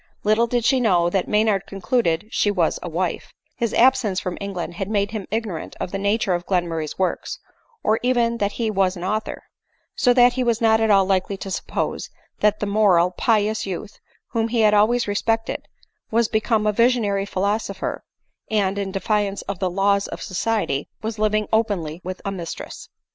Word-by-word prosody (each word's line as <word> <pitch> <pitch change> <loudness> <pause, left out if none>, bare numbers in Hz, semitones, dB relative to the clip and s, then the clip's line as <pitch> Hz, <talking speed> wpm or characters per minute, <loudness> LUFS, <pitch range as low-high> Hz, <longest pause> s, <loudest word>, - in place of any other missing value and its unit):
Little 215 +3 +3
did 240 -1 0
she 265 0 +4
know 175 -7 +3
that 190 -1 0
Maynard 210 -2 +1
concluded 190 -3 0
she 205 - +2
was 180 -5 +1
a 175 - -5
wife: 175 +2 -3 0.2
his 235 -2 -1
absence 235 -6 +3
from 180 -2 -4
England 185 -4 -4
had 195 +3 -4
made 200 -2 0
him 215 -4 -5
ignorant 215 -6 -4
of - - -4
the 195 - -3
nature 200 -1 +1
of 175 0 -3
Glen 180 -3 +1
murray's 160 -2 -4
works, 190 - -2 0.5
or 220 +1 +2
even 240 -2 +1
that 200 0 0
he 225 -2 -1
was 190 -2 +1
an 175 - -7
author; 215 +3 -3 0.5
so 250 - +3
that 245 0 +5
be 255 - 0
was 235 -2 +1
not 220 -1 +4
at 220 - +2
all 195 -2 +5
likely 190 +1 0
to 195 0 -7
suppose - - -3 0.3
that 210 0 +2
the - - -1
moral, 200 -4 +3
pious 215 +1 +1
youth, 195 +3 -6 0.3
whom 230 -1 0
he 230 0 +1
had 210 -1 +5
always 220 +3 +3
respected, 225 +2 -1 0.4
was 230 0 +2
become 220 -1 +1
a 210 - +2
visionary 215 -4 +2
philosopher, 200 0 -2 0.5
and, 200 -2 +1
in 195 -1 -3
defiance 200 0 -1
of 200 -2 -5
the 185 - 0
laws 200 +2 +1
of - - -7
society, 185 -7 -1
was 220 0 -4
living 215 0 +1
openly 185 -8 0
with 185 +1 -6
a 200 - -1
mistress. 175 -4 -7
205 Hz, 185 wpm, -22 LUFS, 190-225 Hz, 0.5 s, that